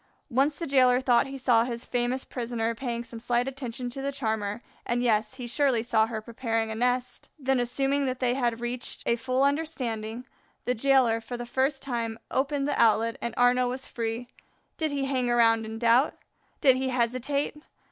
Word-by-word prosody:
Once 275 +4 +2
the 335 - -3
jailer 255 -3 +4
thought 255 -1 +3
he 270 0 -6
saw 245 -3 +3
his 235 -1 -5
famous 245 +1 -1
prisoner 230 -2 -2
paying 235 -1 -3
some 235 -1 -9
slight 240 +2 0
attention 255 -2 -5
to 250 +3 -5
the 280 +1 -1
charmer, 220 -4 -2 0.2
and, 240 +1 -1
yes, 220 0 +1
he 255 -2 -6
surely 245 -2 +2
saw 220 -2 +2
her 220 -2 -5
preparing 225 -1 -2
a - - -3
nest. 250 +2 -1
Then 265 -3 +1
assuming 270 +3 0
that 255 -1 -2
they 245 -1 +2
had 240 -3 -1
reached 240 +1 -3
a 235 - +3
full 255 +3 0
understanding, 250 -6 -2 0.4
the 250 - +1
jailer, 250 -2 +3
for 245 +2 -6
the 240 - -5
first 265 +3 0
time, 230 -4 -3
opened 275 +1 0
the 290 - +1
outlet, 230 0 +3
and 235 -1 -3
Arnaux 245 0 +4
was 260 +2 -4
free. 230 +1 -3 0.5
Did 315 -1 -1
he 280 -2 -1
hang 260 -2 0
around 225 -2 +4
in 220 0 -6
doubt? 235 +5 +3 0.5
Did 265 -4 +6
he 260 0 -1
hesitate? 255 +4 -1
245 Hz, 190 wpm, -27 LUFS, 230-265 Hz, 0.5 s, Did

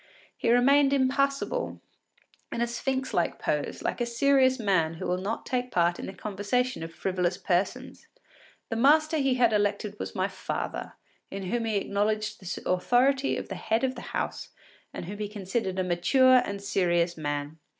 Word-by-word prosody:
He - - -1
remained 275 +3 +5
impassible 275 - 0 0.7
in - - -3
a 235 - +2
sphinx 260 +2 -2
like - - 0
pose, - - -2
like - - -2
a 240 - 0
serious 260 +2 +3
man 185 -8 +1
who - - -6
will 180 +1 0
not 205 +4 -3
take 250 -1 -1
part 175 -4 +1
in - - -5
the 190 - -6
conversation 215 +5 -2
of 165 0 -6
frivolous 180 0 -1
persons. 200 +8 -2 0.6
The 225 - -2
master 310 +5 +4
he 270 -3 +2
had 240 -3 +3
elected 205 0 0
was - - -5
my 190 0 +1
father, 195 -1 -5 0.4
in 195 0 -6
whom 240 -1 0
he 220 -1 -1
acknowledged 215 +2 -1
the 185 -2 -6
authority 255 +9 +2
of - - -6
the - - -4
head 225 +3 -1
of 260 -1 +1
the - - -9 0.2
house, - - -3 0.4
and - - -6
whom 200 +4 -7
he 210 - -2
considered 195 -1 -3
a 185 - +1
mature 245 +9 +4
and 200 0 -5
serious 175 -3 +1
man. 145 0 -4
215 Hz, 175 wpm, -27 LUFS, 185-255 Hz, 0.7 s, remained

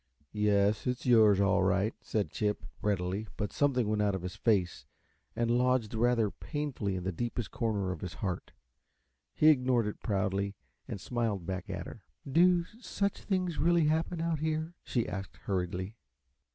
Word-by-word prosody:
"Yes, 105 0 +2
it's 125 0 -2
yours, 110 -5 +6
all 100 -2 +3
right," 100 +3 +2
said 105 -2 -2
Chip, 105 -1 -1 0.2
readily, 100 0 -1
but 105 -1 -3
something 130 -6 +2
went 105 0 +1
out 100 -2 +2
of 95 - -5
his 90 0 -5
face 95 -7 0 0.5
and 115 0 +1
lodged 125 -2 +2
rather 115 -2 +2
painfully 145 - -3
in 90 - -4
the 95 - -1
deepest 120 +3 -3
corner 105 -5 -1
of 90 - -6
his 90 - -5
heart. 95 -4 -4 0.8
He 155 - +6
ignored 125 -5 +3
it 105 - -4
proudly 100 -1 -1 0.3
and - - -5
smiled 110 -5 -2
back 95 +2 -4
at 90 -3 -4
her. 110 - -10 0.3
"Do 175 +5 +4 0.2
such 200 -4 -2
things 185 -4 -1
really 170 -1 +4
happen, 160 +2 0
out 165 -2 0
here?" 160 +2 -1
she 120 -3 -1
asked, 95 +1 -6
hurriedly. 95 +2 -2
110 Hz, 165 wpm, -31 LUFS, 100-130 Hz, 0.8 s, yours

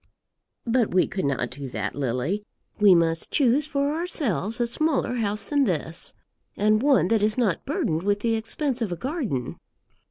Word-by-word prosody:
"But 235 -5 +1
we 185 - +5
could 190 -3 -3
not 130 -3 -1
do 135 +1 -6
that, 105 -3 -3
Lily. 140 - -2 0.4
We 205 -3 +7
must 165 -1 +1
choose 275 +2 +2
for 285 -1 0
ourselves 265 - -2
a 240 - +2
smaller 265 0 0
house 210 -2 -1
than 285 -2 +1
this, 165 - -2 0.4
and 215 +1 +3
one 275 -8 +4
that 225 -2 +2
is 215 +2 +2
not 220 -8 0
burdened 160 0 -1
with 205 +2 0
the 230 0 +1
expense 240 +4 -2
of 215 -5 -1
a - - -1
garden. 250 - -3
215 Hz, 170 wpm, -25 LUFS, 170-260 Hz, 0.4 s, We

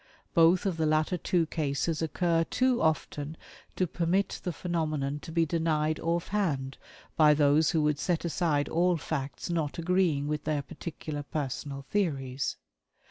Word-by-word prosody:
Both 170 +2 +5
of 185 -4 0
the 160 -1 +1
latter 155 +3 +2
two 175 -1 +1
cases 155 0 -1
occur 165 +1 +1
too 255 +4 +1
often 155 -1 -1 0.4
to 185 - +1
permit 175 +3 0
the 180 - -1
phenomenon 155 -5 -2
to 165 - -9
be 165 0 +2
denied 155 -1 0
off 170 +1 -1
hand 145 -10 -1 0.4
by 150 -1 +6
those 145 +1 +4
who 160 -2 +2
would 150 -1 +1
set 175 -2 0
aside 160 -4 +1
all 175 +1 +2
facts 145 +2 -4
not 160 -4 -1
agreeing 170 -4 +1
with 150 0 -2
their 150 -2 -1
particular 150 +1 -6
personal 140 -1 -4
theories. 135 -6 -1
160 Hz, 150 wpm, -29 LUFS, 145-170 Hz, 0.4 s, by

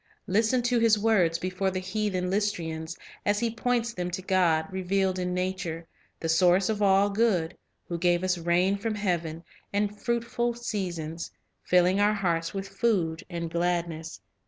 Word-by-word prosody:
Listen 220 +5 +2
to 245 0 +2
his 225 -2 +4
words 200 -6 +3
before 185 +2 -1
the 185 - -3
heathen 185 -1 -2
Lystrians, 165 -5 -2 0.3
as 205 0 +2
he 235 -2 -1
points 235 0 0
them 180 -2 -3
to 180 +1 -5
God 175 -4 +2
revealed 190 0 0
in 180 0 -1
nature, 180 -3 -3 0.3
the 165 - -3
Source 180 +3 +4
of 215 -1 -1
all 200 0 +4
good, 200 -6 +1 0.3
who 170 -1 -3
"gave 175 0 +2
us 185 0 +2
rain 175 +4 +2
from 215 +1 -2
heaven, 170 -5 -2 0.3
and 205 0 0
fruitful 235 0 -1
seasons, 175 -9 -4 0.3
filling 180 +2 +3
our 210 +1 +3
hearts 170 -4 0
with 195 0 -4
food 195 -6 0
and 170 -2 -4
gladness." 170 -2 -2
185 Hz, 160 wpm, -27 LUFS, 170-210 Hz, 0.3 s, his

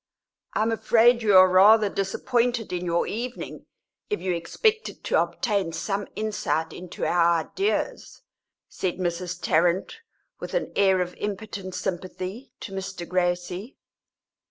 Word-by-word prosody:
"I - - +2
am 225 - +1
afraid 235 +1 +4
you 205 -4 +5
are 185 0 +9
rather 205 +4 +6
disappointed 230 +3 -1
in 180 0 -2
your 170 0 +1
evening 240 +3 -6 0.4
if 420 - -1
you 185 - -1
expected 425 - -1
to - - +2
obtain 200 -8 -1
some 195 +5 -2
insight 210 -7 -2
into 180 -1 -6
our 170 -1 +3
ideas," 395 - -3 0.4
said 185 -2 -3
Mrs. 175 0 -3
Tarrant, 175 - +1 0.4
with - - -6
an - - -1
air 190 -2 +4
of 180 0 -3
impotent 200 -2 -5
sympathy, 185 +6 -5
to 205 - -7
Mr. 190 -2 -5
Gracie. 180 +5 -2
190 Hz, 130 wpm, -25 LUFS, 175-220 Hz, 0.4 s, are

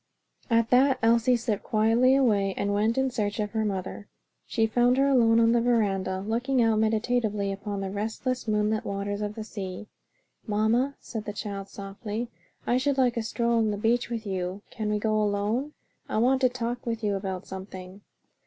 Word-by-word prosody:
At 230 -1 +2
that 260 +1 +5
Elsie 235 +2 +4
slipped 230 -3 -2
quietly 230 +4 +3
away 205 -8 +2
and 205 0 0
went 215 +4 +1
in 265 0 +1
search 205 -3 -2
of 210 -1 -1
her 220 -1 0
mother. 200 0 -4 0.4
She 225 - +1
found 245 +3 +3
her 275 +1 +4
alone 230 -4 +4
on 230 0 +4
the 235 0 +3
veranda 195 -6 +1
looking 240 +6 0
out 225 -2 +3
meditatively 220 -2 0
upon 200 0 -4
the 190 -1 -3
restless 225 +5 -3
moonlit 215 +1 +1
waters 200 0 -3
of 210 0 -3
the 220 - -5
sea. 195 -2 -6 0.6
"Mamma," 225 +6 +1
said 220 -3 -6
the 210 - -4
child 200 -2 -5
softly, 205 +4 -6 0.3
"I 245 - +2
should 275 +1 0
like 250 -2 +3
a 230 - 0
stroll 235 +1 0
on 220 -1 +2
the 205 - -2
beach 230 +4 +1
with 230 -2 -4
you. 190 0 -3
Can 215 -3 -3
we 210 - +1
go 215 +1 0
alone? 210 +8 -1 0.4
I - - -1
want 260 +4 +3
to 255 - +5
talk 245 0 -4
with 230 -1 -3
you 205 -1 +1
about 190 -1 -4
something." 190 0 -9
220 Hz, 190 wpm, -27 LUFS, 205-240 Hz, 0.6 s, that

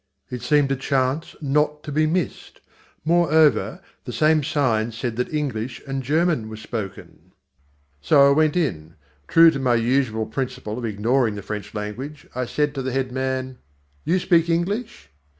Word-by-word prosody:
It 125 -1 -5
seemed 140 +2 +2
a - - +2
chance 135 +3 -1
not 150 +1 0
to 150 - -6
be 155 +2 +2
missed. 175 +2 -3 0.5
Moreover, 160 -6 +3 0.2
the - - -5
same 155 0 +3
sign 120 -7 0
said 115 +1 -4
that 125 - -2
English 130 -6 -3
and 135 -1 -3
German 150 -3 +1
were 110 - -8
spoken. 110 -3 -7 0.7
So 140 - +5
I - - +5
went 155 0 +2
in. 80 - -2 0.3
True 165 0 +7
to 140 - -4
my 125 -2 +2
usual 115 -2 +1
principle 125 -1 -4
of 120 - -4
ignoring 110 +2 +1
the 100 - -7
French 105 -1 -6
language, 125 +9 -6
I 125 0 -2
said 150 +2 0
to 135 - -3
the 130 0 -3
head 130 0 -1
man: 130 0 -3 0.4
"You 180 - +2
speak 170 -2 +2
English?" 205 +8 -2
135 Hz, 165 wpm, -23 LUFS, 120-155 Hz, 0.7 s, True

